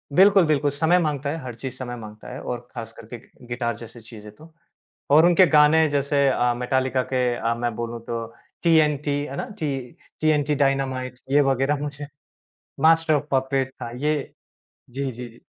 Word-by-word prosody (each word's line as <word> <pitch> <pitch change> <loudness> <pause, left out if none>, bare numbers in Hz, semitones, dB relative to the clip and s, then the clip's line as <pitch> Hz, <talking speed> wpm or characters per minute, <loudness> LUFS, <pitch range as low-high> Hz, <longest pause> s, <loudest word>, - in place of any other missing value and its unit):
बिल्कुल, 195 -1 +6
बिल्कुल, 145 -1 +2
समय 160 +5 +2
माँगता 145 -3 -1
है, 160 - -2
हर 125 -3 -7
चीज़ 130 +2 -7
समय 120 -1 -5
माँगता 105 -1 -11
है 130 - -7
और 120 -1 -4
ख़ास 115 -2 -7
करके 115 +2 -9
गि 120 +1 -19
गिटार 120 -1 -2
जैसी 115 0 -11
चीज़ें 105 -2 -11
तो। 160 +4 -17 0.6
और 155 +4 +7
उनके 175 +1 +6
गाने 155 +1 +5
जैसे 140 0 +1
अ, 125 -2 +2
मेटालिका 130 +1 0
के 125 -1 +1
अ, 115 0 -1
मैं 120 -1 -2
बोलूँ 120 0 -5
तो 115 -1 -3 0.4
टीएनटी 150 -3 +3 0.2
है 140 - -7
ना, - - -4
टी 140 -4 -1 0.4
टीएनटी 150 -1 +2
डायनामाइट 130 -2 -1
ये 145 +1 +5
वगैरह 135 +2 +1
मुझे 145 0 -5 0.7
मास्टर 160 0 +4
ऑफ़ 145 -1 +1
पपेट्स 135 0 0
था, 120 - -4
ये 150 +5 0 0.8
जी, 140 +3 -4
जी, 125 -2 -5
जी। 115 - -18
135 Hz, 180 wpm, -23 LUFS, 120-150 Hz, 0.8 s, और